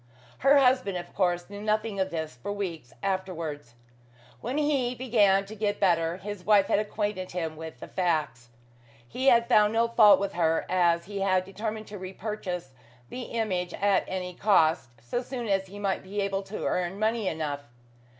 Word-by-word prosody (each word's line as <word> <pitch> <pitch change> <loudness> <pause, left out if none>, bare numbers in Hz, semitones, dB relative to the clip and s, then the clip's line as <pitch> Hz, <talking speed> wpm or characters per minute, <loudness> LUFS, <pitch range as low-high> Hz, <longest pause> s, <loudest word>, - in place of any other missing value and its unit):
Her 275 +2 +5
husband, 255 -8 +3
of 175 0 -8
course, 175 -2 0
knew 205 0 -8
nothing 215 -1 -1
of 190 0 +1
this 160 -5 -4
for 125 +11 -6
weeks 175 -10 -5
afterwards. 165 -9 -3 0.6
When 255 - -3
he 275 -5 +1
began 210 -6 +3
to 205 - -9
get 205 -1 -1
better, 170 -3 +2
his 200 0 -7
wife 205 -1 +5
had - - +2
acquainted 205 -3 -3
him 165 -3 -3
with 160 0 -9
the - - -8
facts. 155 -10 -1 0.6
He 260 - -2
had 235 -2 +5
found 215 -3 +4
no 230 +1 +3
fault 215 -4 +6
with 200 0 -2
her, 165 -2 +1
as 170 -2 +2
he 200 +1 -5
had 185 -1 +2
determined 215 +3 -5
to 205 -1 -9
repurchase 185 -5 -5 0.4
the 255 - -6
image 185 -6 -2
at 200 -1 +2
any 180 -1 -4
cost, 165 - +3
so 180 - -2
soon 245 -2 -5
as 195 -1 +1
he 200 +2 -11
might 200 -2 -1
be 195 +2 -5
able 195 0 -1
to 200 +2 -6
earn 180 +1 -1
money 220 0 0
enough. 150 -4 -3
195 Hz, 180 wpm, -27 LUFS, 175-215 Hz, 0.6 s, fault